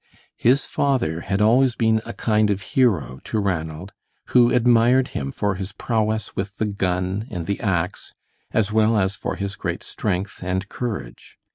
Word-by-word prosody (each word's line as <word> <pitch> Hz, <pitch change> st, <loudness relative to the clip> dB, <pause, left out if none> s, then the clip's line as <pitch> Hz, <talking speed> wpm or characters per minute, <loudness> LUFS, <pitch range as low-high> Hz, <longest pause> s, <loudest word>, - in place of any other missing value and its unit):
His 130 Hz, +4 st, +3 dB
father 125 Hz, -, 0 dB
had 100 Hz, +2 st, -1 dB
always 120 Hz, +3 st, +4 dB
been 110 Hz, -1 st, +2 dB
a -, -, -5 dB
kind 105 Hz, -1 st, +2 dB
of 100 Hz, -1 st, 0 dB
hero 100 Hz, -, +2 dB
to -, -, -2 dB
Ranald, 90 Hz, -2 st, -3 dB, 0.4 s
who 120 Hz, -1 st, +5 dB
admired 125 Hz, +1 st, +4 dB
him 70 Hz, 0 st, -4 dB
for 105 Hz, +5 st, -1 dB
his 95 Hz, +1 st, -6 dB
prowess 110 Hz, -2 st, -1 dB
with 100 Hz, +1 st, -4 dB
the 110 Hz, -, 0 dB
gun 95 Hz, +1 st, -1 dB
and 85 Hz, -7 st, -4 dB
the 100 Hz, +2 st, -2 dB
ax, 90 Hz, -4 st, -2 dB, 0.3 s
as 110 Hz, -2 st, +1 dB
well 110 Hz, +1 st, +3 dB
as 95 Hz, 0 st, +1 dB
for -, -, -4 dB
his 100 Hz, 0 st, -4 dB
great 85 Hz, -2 st, -4 dB
strength 95 Hz, -1 st, -3 dB
and 95 Hz, +1 st, -2 dB
courage. 105 Hz, -, -6 dB
105 Hz, 165 wpm, -22 LUFS, 95-115 Hz, 0.4 s, who